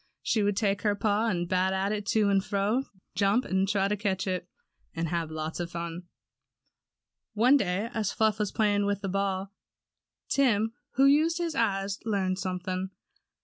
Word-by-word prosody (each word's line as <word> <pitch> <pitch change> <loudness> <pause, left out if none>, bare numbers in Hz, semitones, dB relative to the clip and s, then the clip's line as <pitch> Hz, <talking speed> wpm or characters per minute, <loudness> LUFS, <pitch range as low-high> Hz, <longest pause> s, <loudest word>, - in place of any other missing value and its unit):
She 220 - +1
would 205 -1 +1
take 200 -3 +1
her 205 -2 +1
paw 210 +2 +1
and 175 -5 -1
bat 190 +2 +1
it 210 -1 -3
to 215 -2 +3
and 195 -1 +3
fro, 210 +7 0 0.3
jump 200 +6 +2
and 190 +1 +1
try 200 -2 +2
to 210 - 0
catch 195 -2 -1
it, 185 -2 -3 0.5
and 165 0 -2
have 170 -1 -2
lots 155 +1 -4
of 175 -1 -3
fun 170 +1 -6 1.3
One 245 +6 +5
day 200 -3 0
as 215 -3 -1
Fluff 220 -1 +1
was 210 -2 0
playing 205 -2 +2
with 200 -1 -1
the 195 - -3
ball, 195 0 -2 0.7
Tim, 225 -5 +2 0.2
who 270 +2 +4
used 310 +4 +4
his 340 -2 -2
eyes, 200 -4 0
learned 195 -4 0
something. 185 0 -3
200 Hz, 170 wpm, -28 LUFS, 185-215 Hz, 1.3 s, One